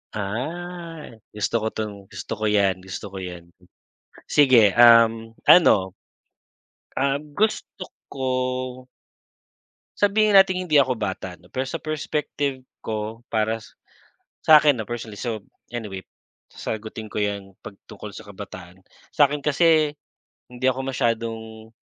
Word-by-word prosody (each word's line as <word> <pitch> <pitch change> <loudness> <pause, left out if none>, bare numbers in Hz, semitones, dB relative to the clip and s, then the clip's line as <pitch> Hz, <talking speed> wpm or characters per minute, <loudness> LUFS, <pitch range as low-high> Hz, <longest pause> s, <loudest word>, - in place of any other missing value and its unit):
Ah. 165 - -5 0.2
Gusto 105 +2 0
ko - - 0
'tong 110 -1 -4
gusto - - -9
ko 110 - -1
'yan 100 -3 +2
gusto 95 +3 -7
ko 95 - -8
'yan. 90 -2 -8 0.8
Sige, 125 -8 +6
um, 115 -1 +6
ano 95 - +6 1.1
um, 140 +1 +1 0.2
gusto 210 -3 -1 0.2
ko 130 -1 -3 1.1
Sabihin 205 0 +4
nating 185 -2 +4
hindi 150 - +5
ako 130 -2 +4
bata 95 -4 -4
'no, 90 - -20
pero 130 +1 -2
sa - - -5
perspective 145 -3 -3 0.2
ko 110 +2 -4
para 110 +1 +1 0.9
sa'kin 150 -4 +7
'no, 110 - -4
personally, 115 -3 -6
so 110 -4 -4 0.3
anyway 105 -5 -5 0.5
sasagutin 110 0 -6
ko - - -4
'yan 100 -2 -3
'pag 100 - -10 0.2
tungkol - - -9
sa - - -9
kabataan. 90 0 -10 0.3
Sa'kin 145 0 +2
kasi 155 0 +3 0.6
hindi 125 +1 -2
ako 130 +1 -1
masyadong, 110 -1 -3
115 Hz, 120 wpm, -23 LUFS, 105-145 Hz, 1.1 s, sa'kin